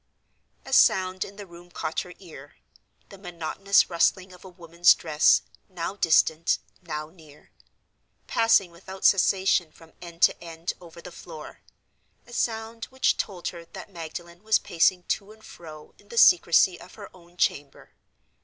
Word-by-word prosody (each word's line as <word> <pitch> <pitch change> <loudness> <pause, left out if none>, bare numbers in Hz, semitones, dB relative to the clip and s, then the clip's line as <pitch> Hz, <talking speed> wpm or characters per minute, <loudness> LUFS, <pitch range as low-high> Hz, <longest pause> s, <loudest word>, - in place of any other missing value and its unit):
A 270 - -7
sound 185 -6 +3
in 200 - -11
the 205 0 -9
room 175 -1 -15
caught - - -4
her - - -8
ear—the 195 - -17
monotonous 180 +2 0
rustling 185 +2 0
of 180 - -16
a 190 - -11
woman's 175 -1 +3
dress, 155 -2 +3 0.3
now 185 +1 -5
distant, 165 -2 +2 0.2
now 155 -3 -6
near; 155 -4 -19 0.7
passing 225 -6 +2
without 190 +3 -10
cessation 190 -3 +3
from 165 0 -19
end 170 0 -7
to - - +3
end 165 +1 -5
over 170 -1 -13
the 180 - -10
floor—a 170 +8 -15
sound 225 -1 -3
which 260 0 0
told 180 -4 -4
her 170 -1 -10
that 185 - -12
Magdalen 170 +1 -9
was 220 0 +3
pacing 175 +2 +1
to 200 +3 -3
and 220 0 -18
fro 155 -3 -13
in 205 - -22
the 235 - -10
secrecy 180 -1 +5
of 185 - -14
her 205 -3 -12
own 175 0 -20
chamber. 140 -4 -2
175 Hz, 150 wpm, -25 LUFS, 170-195 Hz, 0.7 s, secrecy